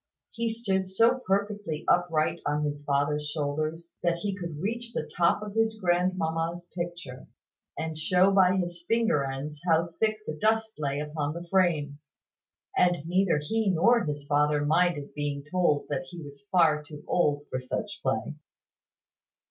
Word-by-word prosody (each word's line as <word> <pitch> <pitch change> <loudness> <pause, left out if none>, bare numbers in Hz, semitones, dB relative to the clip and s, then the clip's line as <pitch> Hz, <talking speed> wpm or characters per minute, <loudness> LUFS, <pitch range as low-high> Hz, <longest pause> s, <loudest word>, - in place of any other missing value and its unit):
He 230 0 -1
stood 195 -5 -1
so 230 +7 +3
perfectly 200 -4 -1
upright 170 -2 +2
on 150 +1 0
his 145 0 -3
father's 145 +1 0
shoulders, 155 +3 -3
that 170 -1 +2
he 200 +2 -3
could 170 -5 -6
reach 235 +5 -3
the - - -3
top 170 +4 +3
of 210 -1 -6
his 220 0 +1
grandmamma's 175 -2 0
picture, 170 -7 -6 0.5
and 160 0 -3
show 180 +5 +3
by 190 -1 +5
his 175 -2 -3
finger 225 -11 +2
ends 140 +2 -5
how 165 -1 +2
thick 215 -1 +2
the - - -3
dust 220 +6 +1
lay 140 -1 -1
upon 150 0 -3
the 170 +1 -7
frame: 155 -7 +2 0.8
and 175 -4 +2
neither 180 -1 +2
he 215 +8 0
nor 230 +7 +4
his 145 -1 -4
father 145 0 +2
minded 160 -2 +1
being 145 -1 -3
told 175 -6 +2
that 145 +3 -2
he 175 -1 -9
was 140 -3 -11
far 160 -4 +4
too 150 0 -11
old 145 -4 +1
for 130 - -1
such 130 0 -4
play. - - -1
170 Hz, 155 wpm, -28 LUFS, 150-190 Hz, 0.8 s, by